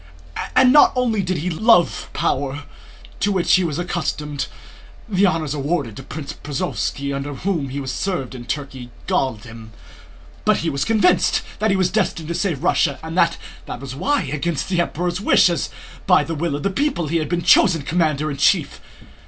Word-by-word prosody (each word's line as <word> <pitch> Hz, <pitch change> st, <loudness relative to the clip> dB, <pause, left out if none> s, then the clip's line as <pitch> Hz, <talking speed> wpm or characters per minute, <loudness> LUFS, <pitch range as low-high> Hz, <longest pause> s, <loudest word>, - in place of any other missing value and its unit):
And 255 Hz, 0 st, +6 dB
not 295 Hz, -, +7 dB
only 235 Hz, -5 st, +1 dB
did 185 Hz, -1 st, -2 dB
he 175 Hz, +4 st, -2 dB
love 190 Hz, 0 st, +3 dB
power 140 Hz, +1 st, -1 dB, 0.6 s
to 205 Hz, -, +1 dB
which 185 Hz, -3 st, +2 dB
he 185 Hz, -, +5 dB
was 155 Hz, -4 st, -2 dB
accustomed 150 Hz, -5 st, -3 dB, 0.6 s
(the 200 Hz, -2 st, +3 dB
honours 160 Hz, -4 st, -1 dB
awarded 145 Hz, -5 st, -2 dB
to -, -, -7 dB
Prince 150 Hz, -2 st, -7 dB
Prozoróvski, 145 Hz, -2 st, -3 dB
under 140 Hz, +1 st, -4 dB
whom 160 Hz, -2 st, -2 dB
he 135 Hz, -, -5 dB
had 140 Hz, -2 st, -4 dB
served 135 Hz, -4 st, -3 dB
in 120 Hz, -2 st, -8 dB
Turkey, 135 Hz, -3 st, -5 dB, 0.2 s
galled 120 Hz, -6 st, -1 dB
him), 115 Hz, -1 st, -12 dB, 0.7 s
but -, -, +3 dB
he 165 Hz, -, +1 dB
was 140 Hz, 0 st, -1 dB
convinced 185 Hz, -5 st, +3 dB, 0.2 s
that 215 Hz, +1 st, +1 dB
he 195 Hz, -, +2 dB
was 185 Hz, -1 st, +1 dB
destined 175 Hz, -6 st, -1 dB
to -, -, -1 dB
save 170 Hz, -5 st, -2 dB
Russia 145 Hz, -5 st, +2 dB
and 160 Hz, +1 st, -6 dB
that 170 Hz, -2 st, +3 dB, 0.3 s
that -, -, -6 dB
was 135 Hz, -1 st, -7 dB
why, 285 Hz, -, 0 dB
against 150 Hz, +4 st, -2 dB
the 180 Hz, -2 st, +2 dB
Emperor's 175 Hz, +2 st, -2 dB
wish 195 Hz, -, +5 dB
and 170 Hz, -4 st, -1 dB, 0.4 s
by -, -, +5 dB
the 165 Hz, -, -4 dB
will 160 Hz, -1 st, -2 dB
of 145 Hz, -, -5 dB
the 200 Hz, -, 0 dB
people, 275 Hz, -, 0 dB
he 165 Hz, +3 st, 0 dB
had 155 Hz, -2 st, -2 dB
been 175 Hz, -1 st, -1 dB
chosen 170 Hz, -8 st, +5 dB
commander 155 Hz, -1 st, 0 dB
in 140 Hz, -, -5 dB
chief. 155 Hz, +3 st, +2 dB
165 Hz, 190 wpm, -21 LUFS, 140-185 Hz, 0.7 s, not